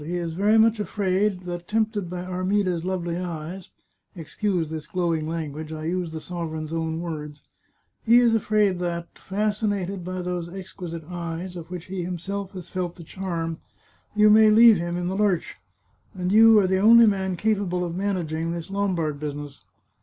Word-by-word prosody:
He 170 +4 -4
is 170 -2 -3
very 205 +5 +3
much 225 0 +4
afraid 195 -1 0
that, 175 -1 -6
tempted 215 -4 0
by 180 0 -5
Armida's 185 -1 0
lovely 175 -2 -2
eyes 175 +1 -6 0.2
— - - -45
excuse 175 0 -2
this 155 -2 -6
glowing 165 -3 -1
language, 155 -1 -5
I 155 0 -5
use 175 0 -2
the 160 - -5
sovereign's 160 -2 -5
own 160 0 -2
words 150 -3 -6 0.3
— - - -46
he 235 +2 +7
is 240 -2 +5
afraid 210 -4 +2
that, 170 -1 -3
fascinated 200 -2 -2
by 185 0 -4
those 175 -1 -3
exquisite 180 -3 -7
eyes, 175 +1 -5
of 170 -1 -8
which 180 -2 -6
he 185 -1 -4
himself 190 +3 -4
has 185 -2 -8
felt 180 -2 -3
the 170 - -11
charm, 165 -2 -4 0.6
you 210 0 +6
may 215 0 +7
leave 225 0 +8
him 175 +1 -3
in 175 0 -2
the 190 - -2
lurch, 200 -4 0 0.6
and 180 0 -2
you 225 +1 +7
are 205 - +5
the 190 0 +1
only 230 +3 +8
man 190 -3 +1
capable 195 -3 0
of 170 -1 -5
managing 170 -4 -2
this 170 +2 -5
Lombard 175 -7 -1
business. 145 -1 -6
180 Hz, 175 wpm, -24 LUFS, 165-200 Hz, 0.6 s, leave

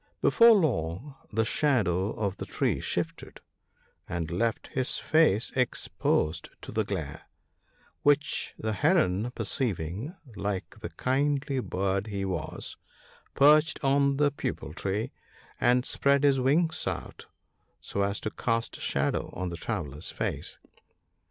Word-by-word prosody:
Before 230 0 +7
long 125 - 0 0.2
the 110 0 +1
shadow 105 - +2
of 100 -2 -2
the - - -6
tree - - 0
shifted, - - -4 0.7
and 85 -2 -3
left 115 +6 -1
his 130 -1 -1
face 155 -9 +3
exposed 85 -9 0
to - - -7
the - - +1
glare; - - -5 0.7
which 145 +1 +1
the 110 0 -2
Heron 120 - +2
perceiving, 110 - -3 0.2
like 100 -2 -4
the - - -5
kindly 140 +1 0
bird 100 -2 -1
he 100 -2 -3
was, 90 -5 -4 0.6
perched 150 +2 +5
on 140 0 +3
the 145 0 +3
Peepul 105 - -4
tree, 100 +7 -2 0.5
and 125 +1 +3
spread 140 0 +2
his 140 -2 +4
wings 155 +5 +2
out - - -5 0.5
so 100 - -3
as 100 +1 0
to 110 - -3
cast 115 +1 -1
a - - -11
shadow 70 +1 0
on 95 0 -3
the 85 - -5
traveller's 75 -2 -4
face. - - -4
115 Hz, 130 wpm, -28 LUFS, 95-140 Hz, 0.7 s, Before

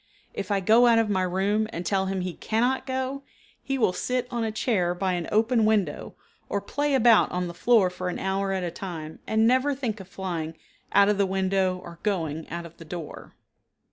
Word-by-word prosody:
If 200 - -5
I 200 -1 +1
go 225 +5 +5
out 230 -1 +5
of 225 -2 +2
my 190 -2 +1
room 195 +4 +1
and 175 +2 -5
tell 190 -1 +1
him 190 -1 -2
he 180 -1 -3
cannot 250 +7 0
go, 260 +1 -2 0.4
he 270 0 -2
will 220 -7 +2
sit 250 +6 -2
on 235 -2 -1
a 220 - -1
chair 190 -6 0
by 185 0 0
an 175 -2 -3
open 225 +2 +3
window 210 -8 0 0.3
or 200 - 0
play 285 +8 -1
about 235 -3 +5
on 180 0 -1
the 170 - -6
floor 195 0 +3
for 180 0 -4
an 180 - -4
hour 195 0 -1
at 190 -1 -1
a 175 - -2
time, 165 -4 -7
and 220 0 +3
never 260 +4 +3
think 235 -6 -3
of 190 - -10
flying 170 -4 -5 0.3
out 200 0 +5
of 205 -1 +1
the 200 - +3
window 190 -1 +1
or 170 -1 -11
going 165 -6 -2
out 170 +1 -5
of 170 0 -13
the 165 - -11
door. 165 -1 -8
195 Hz, 215 wpm, -26 LUFS, 180-225 Hz, 0.4 s, go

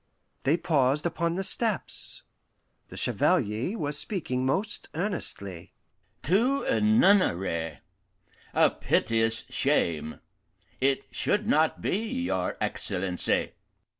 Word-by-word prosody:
They 145 +6 +2
paused 150 -3 +1
upon 170 0 -1
the 190 - -2
steps. 215 +2 +1 0.7
The - - -10
Chevalier 115 - +1
was 145 -4 +1
speaking 130 -10 -2
most 195 +10 -2
earnestly: 125 - -3 0.5
"To 240 - +2
a - - +1
nunnery 140 - +2 0.7
a - - +4
piteous 115 0 0
shame! 80 -2 0 0.6
it 135 +1 +1
should 210 +1 0
not 160 -8 +2
be, - - +1
your 95 - -2
Excellency." 90 -1 -1
145 Hz, 100 wpm, -27 LUFS, -, 0.7 s, a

